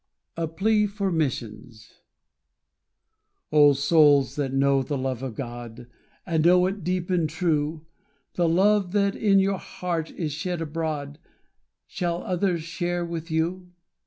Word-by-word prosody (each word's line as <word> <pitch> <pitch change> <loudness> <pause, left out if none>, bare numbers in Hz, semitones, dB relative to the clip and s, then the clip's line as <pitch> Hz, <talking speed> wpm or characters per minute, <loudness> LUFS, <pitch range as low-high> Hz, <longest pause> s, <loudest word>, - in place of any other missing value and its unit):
A 165 -1 -2
Plea 210 +6 +1
for 200 -1 -2
Missions 120 -7 -4 1.5
O, 145 -1 +6
SOULS 145 -1 +4
that 140 -3 -2
know 135 0 +2
the 140 +2 -3
love 130 -2 -3
of 130 -4 -5
God, 120 -1 -7 0.4
And 160 -4 0
know 180 +1 +5
it 195 0 -3
deep 180 +1 -2
and 170 -4 +1
true, 155 -1 -1 0.5
The 170 -2 +1
love 195 +2 +2
that 200 -1 +2
in 200 -2 +3
your 195 0 +2
heart 170 -3 -4
is 160 -4 -4
shed 170 +4 -3
abroad 155 -2 -4 0.7
Shall 175 -2 -3
others 180 -2 -1
share 175 +1 -2
with 170 0 -6
you? 175 +3 -2
165 Hz, 135 wpm, -25 LUFS, 145-180 Hz, 1.5 s, O